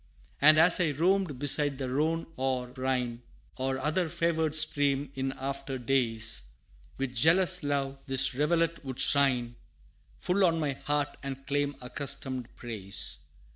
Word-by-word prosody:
And 155 +2 +7
as 165 +3 +5
I 160 -5 +1
roamed 175 -1 +1
beside 145 0 +3
the 130 -1 -4
Rhone 155 +5 0
or 130 -1 -2
Rhine, 125 -2 -2 0.4
Or 130 +1 -1
other 155 +5 -1
favored 160 -2 0
stream, 145 -3 +1
in 135 0 -2
after 135 0 -5
days, 115 -3 -1 0.6
With 135 -2 -3
jealous 175 +8 +4
love, 140 -1 -2
this 135 0 +1
rivulet 165 +4 0
would 130 -2 -7
shine, 125 -4 +3 0.6
Full 195 - 0
on 165 -3 +3
my 150 -3 0
heart, 145 +1 -2
and 135 -1 -7
claim 145 0 -1
accustomed 130 -1 -5
praise. 105 -5 -1
140 Hz, 135 wpm, -29 LUFS, 130-155 Hz, 0.6 s, And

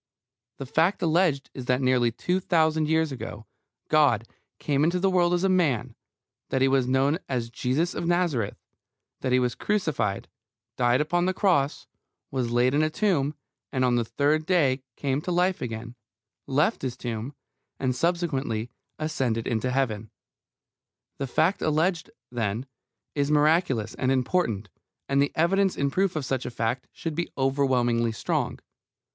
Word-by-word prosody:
The 135 - -6
fact 165 +9 +1
alleged 160 -4 +2
is 130 - -7
that 125 0 +2
nearly 130 -2 +2
two 180 +10 -1
thousand 160 -4 +2
years 160 -1 +2
ago 115 -4 -7 0.4
God 140 -8 +3 0.3
came 145 -1 0
into 170 +3 +2
the 190 +1 +2
world 175 -2 +3
as 175 +1 +1
a - - +4
man, 165 - +1 0.6
that 130 - +1
He - - +5
was 135 -2 +2
known 135 +5 +2
as 120 -3 -2
Jesus 140 +9 0
of 170 - -3
Nazareth, 170 - 0 0.6
that 130 - -2
He 125 - +5
was 125 -1 +1
crucified, 160 - -1 0.5
died 120 +2 +3
upon 175 +4 +1
the 185 - 0
cross, 160 -9 +1 0.5
was 130 -3 -1
laid 120 +2 +2
in 145 - +3
a 155 - +2
tomb, 155 -5 0 0.4
and 130 -1 +1
on 125 -1 +2
the 120 - +2
third 150 +6 0
day 140 -8 +2
came 140 0 -1
to 180 - -3
life 180 +1 +1
again, 115 0 -5 0.5
left 150 - +1
His 130 -2 -3
tomb, 120 +3 -5 0.4
and 130 -2 0
subsequently 135 -8 -1 0.3
ascended 130 -7 -1
into 120 +1 -1
Heaven. 115 -5 -1 1.1
The 135 - -2
fact 165 +9 +1
alleged, 160 +2 +1 0.2
then, 115 0 -2 0.5
is 145 -1 0
miraculous 150 - +2
and 130 - 0
important, 125 - 0 0.4
and 140 0 +2
the 140 - +1
evidence 190 +4 +2
in 140 -1 0
proof 190 +1 +1
of 150 -3 -2
such 130 -1 -2
a - - -2
fact 120 +1 -2
should 165 - -5
be 170 +3 -2
overwhelmingly 125 -4 +1
strong. - - -1
140 Hz, 160 wpm, -26 LUFS, 125-165 Hz, 1.1 s, He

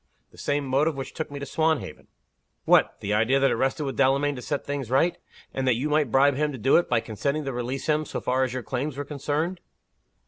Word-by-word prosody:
"The - - -19
same 145 0 -1
motive 140 +4 +1
which 135 -1 -6
took 160 - -4
me 145 - -7
to 140 - -5
Swanhaven." 155 - -1 0.6
"What! - - +4
the 100 - -1
idea 115 +6 +3
that 135 - +3
it - - +1
rested 135 +3 0
with 135 -2 -4
Delamayn 140 +2 +2
to 125 - -7
set 145 +2 -3
things 140 -4 -4
right? 135 +7 +3 0.4
and 135 -1 -2
that 125 - +4
you 135 +6 -2
might 150 -3 +2
bribe 140 +3 +5
him 150 +2 0
to 135 - -6
do 130 +4 +3
it, 175 - +1
by 120 -2 +2
consenting 140 +8 -2
to 135 - -3
release 125 +2 -3
him, 155 0 +1
so - - -4
far 130 +1 +1
as 130 - -1
your 130 0 -4
claims 135 +3 -3
were 145 - -3
concerned?" 150 +5 -2
140 Hz, 240 wpm, -25 LUFS, 130-150 Hz, 0.6 s, bribe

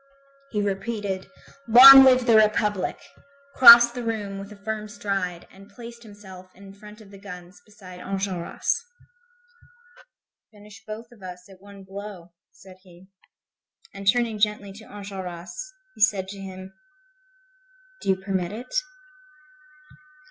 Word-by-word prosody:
He 210 -4 -3
repeated: 200 -1 -4 0.4
"Long 265 +4 +10
live 255 -1 +4
the 230 - +3
Republic!" 210 -3 +1 0.5
crossed 235 -1 +8
the 245 - -6
room 210 -4 -5
with 200 +1 -11
a - - -11
firm 215 +1 -6
stride 195 -4 -5
and 195 +1 -17
placed 235 +2 -13
himself 200 -4 -14
in 195 0 -15
front 210 +2 -15
of 200 -2 -17
the 200 - -14
guns 180 -2 -12
beside 190 -4 -14
Enjolras. 190 -2 -4 1.7
"Finish 205 -2 -16
both 225 +2 -9
of 235 -4 -20
us 180 -1 -11
at 190 -1 -18
one 200 -1 -15
blow," 195 -2 -11 0.2
said 190 -2 -17
he. 185 0 -20 0.8
And 195 0 -10
turning 230 -2 -3
gently 205 -1 -2
to 215 +2 -14
Enjolras, 190 -3 -9 0.4
he - - -15
said 195 -3 +2
to 200 0 -10
him: 190 0 -10 1.3
"Do - - -5
you 190 - +3
permit 190 -2 -4
it?" 240 +4 -10
200 Hz, 135 wpm, -23 LUFS, 190-215 Hz, 1.7 s, Long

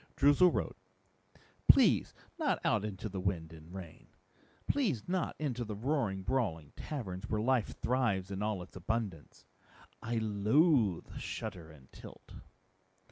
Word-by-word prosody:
Droozle 145 +6 +6
wrote, - - -2 0.9
"Please - - +5 0.2
not - - +2
out - - +2
into 105 0 -4
the 95 -2 -5
wind 85 -4 -2
and 80 -1 -13
the 90 - -12
rain. 85 -4 -10 0.6
Please 205 - 0
not 180 -1 -1
into 125 -5 -2
the 105 -2 -5
roaring, 110 -5 -1
brawling 90 - -1
taverns 110 -8 -5
where 110 - 0
life 120 0 +1
thrives 110 -7 +1
in 95 0 -3
all 105 -4 -1
its 90 - -16
abundance. 95 -4 -4 0.6
I 120 +1 -2
loathe 110 - +2
shudder 85 -3 -5
and 70 -5 -16
tilt." - - -13
105 Hz, 135 wpm, -33 LUFS, 95-130 Hz, 0.9 s, Droozle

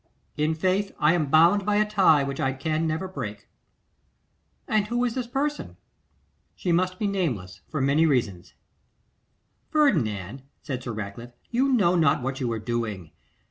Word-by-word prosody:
'In 155 +1 0
faith; 190 +4 0
I 150 +2 +4
am 160 -4 0
bound 170 +7 +5
by 205 +1 +1
a 210 0 +3
tie 190 -9 +4
which 135 0 -4
I 135 0 0
can 155 +4 -1
never 160 +4 -2
break.' 110 - -7 1.2
'And 210 -1 +1
who 240 +2 0
is 240 - -1
this 250 -1 -3
person?' 290 +4 -3 0.8
'She 180 - -2
must 185 +2 +1
be 210 - -2
nameless, 125 - -2
for 155 - -2
many 145 +4 +3
reasons.' 105 - -1 1.1
'Ferdinand,' 130 - +1 0.2
said 130 -4 -4
Sir 125 - -5
Ratcliffe, 110 +3 -7 0.2
'you 260 +3 +2
know 190 -8 +3
not 155 -7 +2
what 130 0 -3
you 125 -3 -1
are 115 - -2
doing. 110 -7 -4
155 Hz, 160 wpm, -25 LUFS, 120-200 Hz, 1.2 s, bound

